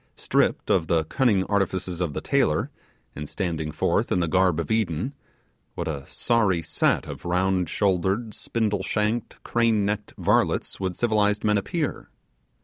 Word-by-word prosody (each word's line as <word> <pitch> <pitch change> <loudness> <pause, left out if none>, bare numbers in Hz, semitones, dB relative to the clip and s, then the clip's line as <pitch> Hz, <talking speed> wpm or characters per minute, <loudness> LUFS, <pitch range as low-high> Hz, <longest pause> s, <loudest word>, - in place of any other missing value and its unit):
Stripped - - +1
of 85 -4 +2
the 80 -1 +2
cunning 105 - +2
artifices 95 -3 -1
of 85 -5 -1
the - - -2
tailor, - - +1 0.4
and 75 0 -6
standing 80 -5 -3
forth - - 0
in 90 - +2
the 85 - +1
garb 90 0 +2
of 85 - -3
Eden 110 - 0 0.6
what - - -3
a 70 -4 -4
sorry, 100 -8 +1
set - - +1
of - - -8
round 90 0 +1
shouldered, 100 +4 0
spindle 105 -4 -1
shanked, 105 +4 -1
crane 115 -3 +2
necked 105 0 -3
varlets - - +1
would 95 -2 -2
civilized 105 -3 +1
men 105 -1 +3
appear! 150 - -3
95 Hz, 150 wpm, -25 LUFS, 85-110 Hz, 0.6 s, men